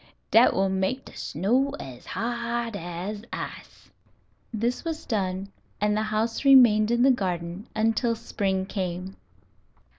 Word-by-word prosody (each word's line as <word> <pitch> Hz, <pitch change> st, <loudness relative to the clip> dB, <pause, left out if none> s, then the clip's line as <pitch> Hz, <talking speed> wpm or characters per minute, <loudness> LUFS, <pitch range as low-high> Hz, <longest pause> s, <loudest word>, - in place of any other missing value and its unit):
"Dat 230 Hz, +2 st, +6 dB
will 195 Hz, +1 st, +2 dB
make 190 Hz, +8 st, -1 dB
de -, -, -13 dB
snow 255 Hz, -, 0 dB
as 125 Hz, -2 st, -9 dB
hard 235 Hz, -1 st, -2 dB
as 175 Hz, +4 st, -5 dB
ice." -, -, -8 dB, 0.6 s
This 235 Hz, +2 st, -1 dB
was 325 Hz, -2 st, -4 dB
done, 195 Hz, -3 st, -2 dB, 0.3 s
and 210 Hz, 0 st, +2 dB
the 215 Hz, -, +1 dB
house 220 Hz, +3 st, -1 dB
remained 240 Hz, -6 st, +7 dB
in 240 Hz, +1 st, +3 dB
the 270 Hz, -, +6 dB
garden 180 Hz, -2 st, -3 dB
until 225 Hz, +2 st, +1 dB
spring 190 Hz, -4 st, -2 dB
came. 185 Hz, -1 st, -4 dB
215 Hz, 130 wpm, -26 LUFS, 190-235 Hz, 0.6 s, remained